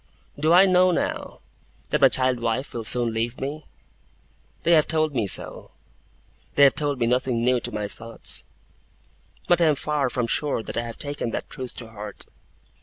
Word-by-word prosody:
Do 155 +2 +2
I 180 +3 +7
know, 185 -1 +4
now, 175 - -3 0.5
that - - +1
my - - +7
child 130 -1 +2
wife 115 +3 -2
will 115 - -4
soon 120 0 +2
leave 115 +2 -2
me? 145 +3 -5 1.0
They 170 - +2
have 155 -3 +5
told 155 -2 0
me 115 -6 0
so; - - 0 0.9
they 140 - +5
have 140 - +7
told 145 -2 -1
me 120 - +2
nothing 125 -1 0
new 125 0 +2
to - - -4
my 105 -1 -3
thoughts 100 - -3 1.0
but 175 0 +3
I - - +5
am 155 -2 +3
far 145 -1 -1
from 125 -1 -1
sure 135 -1 -1
that - - -7
I 115 - 0
have 115 -1 -7
taken 145 -4 -3
that - - -5
truth 130 -1 -6
to 115 -2 -9
heart. 105 -1 -8
130 Hz, 185 wpm, -24 LUFS, 115-150 Hz, 1.0 s, I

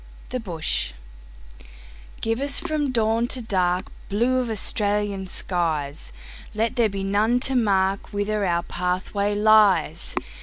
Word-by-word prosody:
The 255 - -3
Bush 165 - -2 1.3
GIVE 225 +3 -1
us 280 0 +1
from 310 -4 -1
dawn 230 0 +1
to 255 - -2
darkBlue 200 +5 0
of 245 - -4
Australian 205 -2 0
skies, 155 - -2 0.4
Let 225 +3 0
there 235 -4 +3
be 195 -1 -4
none 210 +5 +2
to 270 - +2
markWhither 205 -1 0
our 170 0 0
pathway 185 +3 -1
lies. 205 -6 +3
205 Hz, 115 wpm, -23 LUFS, 185-230 Hz, 1.3 s, there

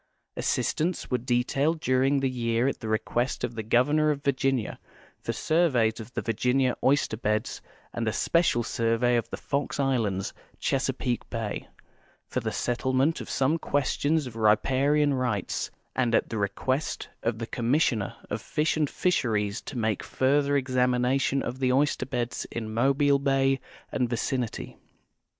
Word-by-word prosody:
Assistants 165 0 -1
were 125 - +2
detailed 130 +6 +1
during 135 +1 +2
the 135 - +2
j^ear 120 0 0
at 135 - -2
the 110 - -6
i 110 0 +2
equest 120 +4 -2
of 120 - -2
the 115 - -4
Governor 145 +8 +3
of 145 -2 -1
Virginia 135 -4 0 0.4
for - - -3
surveys 130 -10 +2
of 110 +2 -9
the - - -2
Virginia 125 +3 +1
oyster 135 -5 +2
beds, 105 -1 -1 0.3
and 115 -1 -2
a - - +2
special 165 -3 +2
survey 115 +2 +1
of 120 - -1
the - - -5
Fox 140 0 -2
islands, 115 -9 0 0.2
Chesapeake 130 -2 -1
bay, 115 -3 -4 0.6
for - - -2
the - - -3
settlement 130 +5 0
of - - -8
some 135 +5 +1
questions 145 +2 0
of 125 -3 -8
riparian 135 +7 +3
rights, 125 -7 -1 0.3
and 120 -3 +2
at - - +1
the 110 - -3
request 130 +8 -1
of 115 -1 -1
the 115 - -4
Commissioner 115 -3 0 0.2
of 105 +1 -2
Fish 155 +8 0
and 155 -3 +1
Fisheries 110 - 0
to 140 - -7
make 110 -2 0
further 140 +2 +2
examination 130 +1 +1
of 125 +2 -4
the 130 -1 +2
oyster 135 -1 +1
beds 125 -3 -3
in 110 -2 -5
Mobile 140 +4 +3
bay 135 -1 +2 0.3
and 125 -2 0
vicinity. 120 0 -2
130 Hz, 155 wpm, -27 LUFS, 115-140 Hz, 0.6 s, Governor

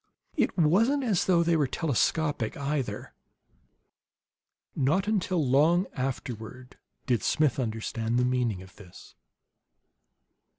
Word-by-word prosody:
It - - 0
wasn't 220 - +3
as 210 -8 +1
though 175 -2 +3
they 170 0 +2
were 150 -4 +2
telescopic, 145 -3 -1
either. 140 -2 -3 1.6
Not 160 +9 +1
until 185 -7 0
long 160 +8 +3
afterward 125 -1 -6 0.3
did 120 -5 +1
Smith 150 -4 +1
understand 115 0 -2
the 125 - +2
meaning 120 -7 -1
of 95 0 -17
this. 95 -4 -14
140 Hz, 110 wpm, -27 LUFS, 120-170 Hz, 1.6 s, wasn't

